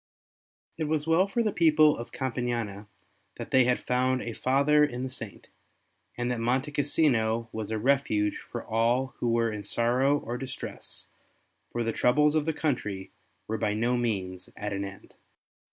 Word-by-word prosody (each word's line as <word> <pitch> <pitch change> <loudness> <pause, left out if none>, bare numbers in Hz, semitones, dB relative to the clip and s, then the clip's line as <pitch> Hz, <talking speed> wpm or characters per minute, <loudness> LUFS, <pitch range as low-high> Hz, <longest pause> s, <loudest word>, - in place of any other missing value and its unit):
It 160 - 0
was 150 -1 0
well 165 +4 +3
for 235 +4 0
the 215 - +1
people 155 -3 +5
of 120 0 -8
Campania 120 -6 -3 0.5
that - - -7
they 130 -1 +5
had 125 0 +2
found 130 +1 +1
a 115 - -4
father 140 +5 +3
in 125 -4 -1
the 130 - -4
Saint, 115 -7 -7 0.7
and 120 0 -1
that 120 - -2
Monte 130 +5 0
Cassino 120 -6 +1
was 110 -2 -5
a 110 - -1
refuge 110 -4 +1
for - - -7
all 120 +4 +1
who 120 - 0
were 115 -1 +2
in 105 -1 -5
sorrow 125 +7 +2
or 120 -3 -5
distress, 130 -1 -7 0.7
for 120 - -1
the 115 0 -1
troubles 150 +4 +3
of 155 -2 +1
the - - +3
country 105 -12 -2 0.4
were 110 0 -2
by 105 0 0
no 120 +3 +1
means 95 -7 -2
at 105 0 -3
an 100 0 -2
end. 95 0 -9
125 Hz, 170 wpm, -28 LUFS, 110-140 Hz, 0.7 s, people